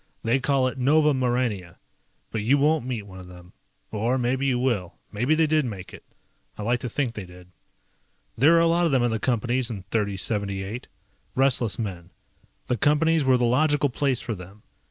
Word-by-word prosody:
They 120 +4 +2
call 135 0 +1
it 130 +1 -5
Nova 150 +3 +4
Maurania. 120 -9 -1 0.5
But 110 - -2
you 125 +7 +3
won't 150 -2 +2
meet 120 -5 -3
one 95 -2 -12
of 90 - -11
them. 90 0 -14 0.4
Or 115 +4 0
maybe 130 +2 0
you 130 -2 +1
will, 115 -8 -1 0.2
maybe 125 +9 +1
they 160 0 +3
did 155 0 +2
make 100 -7 -7
it. - - -11 0.5
I 105 - -5
like 120 +3 +1
to 125 - -4
think 125 0 -2
they 105 - -6
did. 90 0 -15 0.8
There 145 +8 +5
were 165 - +5
a - - +4
lot 170 +1 +3
of - - -1
them 130 -3 +2
in 120 - +1
the 110 - -1
Companies 120 +1 0
in 100 -5 -6
3078. 100 0 -1 0.5
Restless 130 -5 +2
men. 90 -7 -5 0.6
The 125 - -1
Companies 155 +5 +2
were 130 -1 +4
the 125 - +1
logical 145 +4 +2
place 135 -1 0
for 115 - -4
them. 95 +2 -12
120 Hz, 195 wpm, -25 LUFS, 105-135 Hz, 0.8 s, There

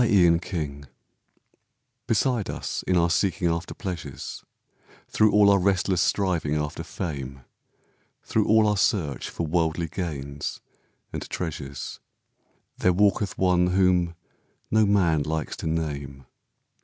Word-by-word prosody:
THE 100 -7 +5
QUESTION 70 -6 -5 1.2
Beside 120 -6 +1
us - - -3
in 90 - +3
our 85 0 +3
seeking 90 0 +1
after 85 +1 -3
pleasures, 85 - -6 0.6
Through 110 -1 +3
all 105 -1 +6
our 100 - +4
restless 95 -1 +2
striving 90 -7 +1
after 75 +1 -2
fame, 70 -6 -5 0.8
Through 110 -2 0
all 110 0 +5
our 105 -1 +2
search 85 -7 0
for 85 - -3
worldly 80 +1 0
gains 75 -5 -5 0.5
and - - -5
treasures, 70 -5 -5 0.8
There 90 - +4
walketh 100 0 +2
one 90 -1 +3
whom 90 -2 +2 0.6
no 110 -1 +4
man 85 -7 +3
likes 80 0 -2
to - - -4
name. 70 -4 -3
85 Hz, 120 wpm, -25 LUFS, 75-95 Hz, 1.2 s, all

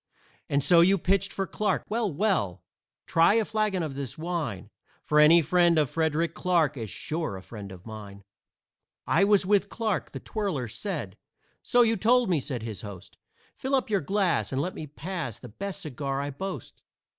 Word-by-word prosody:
And 140 0 +1
so 170 +4 +6
you 190 +3 +5
pitched 195 +2 +1
for 195 - -2
Clarke. 210 +3 -1
Well, 220 -2 -1
well! 150 - 0 0.4
Try 170 +5 +4
a 225 -1 +3
flagon 210 -5 0
of 155 -3 -4
this 135 -2 -4
wine, 155 - -4 0.3
For 150 - +2
any 160 +2 +7
friend 175 +1 +4
of 150 -5 +2
Frederick 160 0 0
Clarke 170 -6 +1
Is 115 -5 -5
sure 155 - -4
a - - -9
friend 100 -3 -9
of 90 -1 -12
mine." 105 -3 -9 0.8
"I - - +3
was 200 -2 +4
with 200 +1 +2
Clarke," 220 -4 -2
the - - -6
twirler 190 - -3
said. 130 - -5 0.4
"So 245 0 +4
you 225 -1 +2
told 240 -2 +3
me," 165 - +3
said 125 -4 -4
his 110 -4 -4
host. 100 -4 -10 0.4
"Fill 265 +1 -1
up 255 -4 -1
your 200 - +2
glass, 190 +2 +1
and 135 - -1
let 180 +6 -2
me 155 - -7
pass 150 - -5
The 125 - -11
best 195 - -6
cigar 140 -2 -3
I 140 +1 -3
boast." 180 - -7
165 Hz, 185 wpm, -27 LUFS, 135-195 Hz, 0.8 s, any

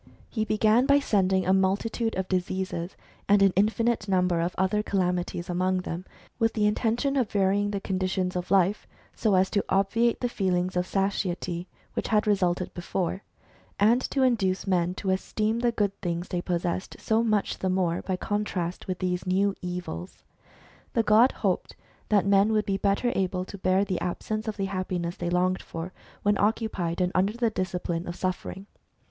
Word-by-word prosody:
He 220 -2 -1
began 215 +4 +3
by 280 0 +6
sending 190 -8 +2
a 190 - +3
multitude 205 +4 +1
of 190 0 -2
diseases, 185 -1 -2 0.3
and 200 0 +6
an 195 -2 +4
infinite 220 +2 +1
number 180 -3 +2
of 170 +2 -2
other 190 +3 +2
calamities 180 -3 -1
among 185 +1 0
them, 180 +1 -5 0.3
with 225 -1 +2
the 210 -2 +1
intention 230 +6 +1
of 250 -6 +1
varying 200 +1 +2
the 200 -1 -2
conditions 185 -1 -1
of 180 0 -3
life 195 +1 +2 0.3
so 215 -4 +2
as 185 +1 +3
to 200 - +1
obviate 210 +5 +2
the 245 - 0
feeling 185 -5 0
of 180 0 0
satiety 185 -3 -1 0.3
which - - -2
had 215 0 +2
resulted 185 -3 +1
before, 175 +1 -2 0.6
and 225 +5 +4
to 270 - +1
induce 195 -7 +1
men 180 -2 +1
to 190 - -1
esteem 215 +4 -1
the 240 0 +2
good 205 -3 0
things 175 0 -3
they 175 - -1
pos 175 -1 -2
sessed 180 +1 -3
so 220 +1 +1
much 215 -3 0
the 190 - 0
more 180 -2 +1
by 190 - -2
contrast 185 -3 -3
with 185 -1 -2
these 180 0 -2
new 195 +2 +2
evils. 175 - -6 0.7
The 230 - +2
god 225 +4 +5
hoped - - -2 0.3
that 205 -2 +3
men 200 +2 +4
would 215 -1 +2
be 195 -1 0
better 200 +5 +1
able 185 -1 -1
to 200 - -9
bear 190 +1 +2
the 185 -3 -2
absence 215 +5 -3
of 215 - -3
the 195 - -1
happiness 185 -2 -3
they 175 - -2
longed 180 +1 +1
for, 165 +3 -7 0.3
when 205 0 +2
occupied 200 -5 0
and 180 0 +1
under 195 +3 +2
the 235 -1 0
discipline 180 -2 -3
of 175 - -4
suffering. 185 +1 -4
190 Hz, 180 wpm, -27 LUFS, 180-210 Hz, 0.7 s, by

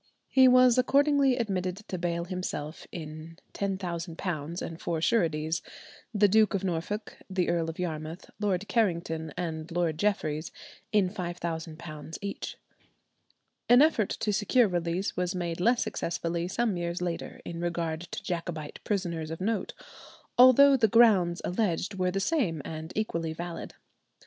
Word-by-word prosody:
He 260 -1 +6
was 255 -1 +6
accordingly 280 0 +4
admitted 185 -6 -1
to 185 - -3
bail 170 0 -1
himself 175 -4 -5
in 155 0 -8 0.2
£10,000, 170 -4 -3
and 165 0 -7
four 165 -2 -1
sureties—the 165 +3 0
Duke 215 +1 +4
of 195 - -1
Norfolk, 190 +4 -3
the 185 -2 0
Earl 165 -1 0
of 160 - -6
Yarmouth, 160 -1 -5
Lord 205 -1 0
Carrington, 170 -7 0
and 160 -2 -4
Lord 165 -2 0
Jeffereys—in 185 +1 -1
£5,000 165 -4 -5
each. 200 0 -5 1.1
An 245 +4 +8
effort 240 -10 +2
to 210 - -1
secure 215 +4 +3
release 175 +1 -1
was 180 +1 -1
made 170 -2 -3
less 235 +4 +3
successfully 170 -5 -2
some 215 0 0
years 170 0 -2
later 175 -2 -4
in 170 0 -5
regard 170 -2 -2
to 175 - -7
Jacobite 170 -3 -4
prisoners 170 -6 -2
of 160 - -5
note, 205 0 -2 0.6
although 265 +3 +8
the 230 -4 +4
grounds 195 -6 +4
alleged 185 0 0
were 185 -1 0
the 195 +2 -1
same 195 - 0
and 160 +1 -6
equally 170 -7 -1
valid. 170 +1 -6
180 Hz, 135 wpm, -28 LUFS, 165-210 Hz, 1.1 s, An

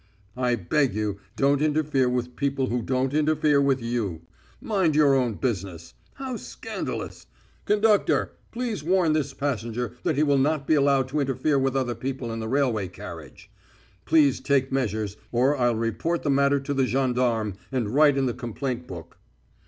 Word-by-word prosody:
"I 125 -1 +1
beg 120 - 0
you, 105 -2 -2 0.2
don't 140 +1 +2
interfere 150 -4 +1
with 125 0 -2
people 135 -2 -1
who 120 +1 -1
don't 130 +3 -1
interfere 150 -1 +3
with 135 -3 +1
you. 110 -9 -2 0.4
Mind 190 -8 +1
your 150 -2 +5
own 125 -5 +1
business. 95 -9 -4 0.2
How 265 -3 -5
scandalous! - - -6 0.4
Conductor, 210 0 +2 0.2
please 230 - -3
warn 175 -1 +2
this 145 -3 -1
passenger 120 -3 -3
that 165 -4 0
he 150 - +2
will 140 -2 +3
not 145 +1 +1
be 155 - +2
allowed 140 -3 +3
to 150 +3 -1
interfere 140 +1 +1
with 135 0 0
other 130 -3 0
people 125 0 -4
in 115 - -4
the 110 - -4
railway 125 -7 +1
carriage. 85 -6 -11 0.5
Please 145 -5 +4
take 135 -2 +1
measures, 110 -6 -2
or 130 +4 +3
I'll 120 -3 +2
report 115 +10 -1
the 145 - +1
matter 140 +1 +3
to 140 +1 -3
the 135 -2 +1
gendarme, 125 -4 0 0.2
and 120 -5 -2
write 145 -1 +5
in 135 - +2
the 125 - 0
complaint 125 +1 -4
book." 85 -3 -10
135 Hz, 170 wpm, -25 LUFS, 115-145 Hz, 0.5 s, your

